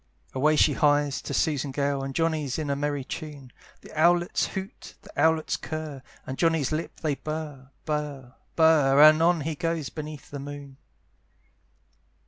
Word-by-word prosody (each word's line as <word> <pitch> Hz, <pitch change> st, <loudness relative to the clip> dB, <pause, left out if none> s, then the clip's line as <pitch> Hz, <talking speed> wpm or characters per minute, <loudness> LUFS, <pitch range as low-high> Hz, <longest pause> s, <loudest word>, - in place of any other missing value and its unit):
Away 150 Hz, +4 st, +3 dB
she 150 Hz, 0 st, +4 dB
hies 145 Hz, 0 st, +2 dB
to -, -, -7 dB
Susan 145 Hz, -3 st, 0 dB
Gale: 140 Hz, 0 st, -1 dB
And 135 Hz, 0 st, -5 dB
Johnny's 155 Hz, -5 st, 0 dB
in 150 Hz, -3 st, -2 dB
a -, -, 0 dB
merry 145 Hz, -1 st, -2 dB
tune, 140 Hz, -2 st, -8 dB, 0.3 s
The -, -, -14 dB
owlets 175 Hz, +2 st, +2 dB
hoot, 190 Hz, +1 st, -8 dB
the -, -, -14 dB
owlets 160 Hz, -1 st, +2 dB
curr, 155 Hz, -3 st, -6 dB, 0.2 s
And 130 Hz, -, -6 dB
Johnny's 165 Hz, -5 st, +2 dB
lips 155 Hz, +2 st, -4 dB
they 155 Hz, -2 st, +1 dB
burr, 150 Hz, -3 st, -6 dB, 0.2 s
burr, 145 Hz, -5 st, -4 dB, 0.2 s
burr, 155 Hz, -4 st, +5 dB
And 155 Hz, +1 st, +8 dB
on 170 Hz, -1 st, +3 dB
he 160 Hz, +2 st, -2 dB
goes 165 Hz, -1 st, -2 dB
beneath 155 Hz, -2 st, -8 dB
the 145 Hz, -, -5 dB
moon. 140 Hz, -1 st, -9 dB
150 Hz, 155 wpm, -26 LUFS, 140-160 Hz, 0.3 s, And